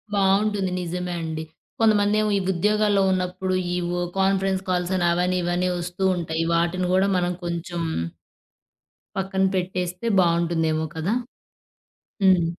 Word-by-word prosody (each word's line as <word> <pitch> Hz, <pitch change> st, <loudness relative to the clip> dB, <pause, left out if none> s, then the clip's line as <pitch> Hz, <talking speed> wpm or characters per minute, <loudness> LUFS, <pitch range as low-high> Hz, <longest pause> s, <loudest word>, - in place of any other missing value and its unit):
బావుంటుంది. 195 Hz, 0 st, +2 dB
నిజమే 180 Hz, +1 st, -3 dB
అండి. 160 Hz, -1 st, -4 dB, 0.4 s
కొంతమందేమో 215 Hz, -1 st, +3 dB
ఈ -, -, +1 dB
ఉద్యోగాల్లో 210 Hz, +2 st, +2 dB
ఉన్నప్పుడు 185 Hz, 0 st, -1 dB, 0.2 s
ఈ -, -, 0 dB, 0.2 s
ఒ -, -, -1 dB, 0.2 s
కాన్ఫరెన్స్ 190 Hz, 0 st, +2 dB
కాల్సని, 180 Hz, 0 st, 0 dB
అవని 180 Hz, +1 st, +1 dB
ఇవని 175 Hz, +1 st, 0 dB
ఒస్తూ 180 Hz, +2 st, -4 dB
ఉంటాయి. 165 Hz, -1 st, -2 dB
వాటిని 175 Hz, +2 st, +1 dB
గూడా 190 Hz, +2 st, +3 dB
మనం 180 Hz, 0 st, 0 dB
కొంచుం... 170 Hz, 0 st, -3 dB, 1.3 s
పక్కన 190 Hz, 0 st, 0 dB
పెట్టేస్తే 180 Hz, +2 st, -2 dB
బావుంటుందేమో 170 Hz, -2 st, +1 dB
కదా! 165 Hz, +6 st, -1 dB, 1.1 s
హ్మ్. 185 Hz, -3 st, +5 dB
180 Hz, 115 wpm, -24 LUFS, 170-195 Hz, 1.3 s, హ్మ్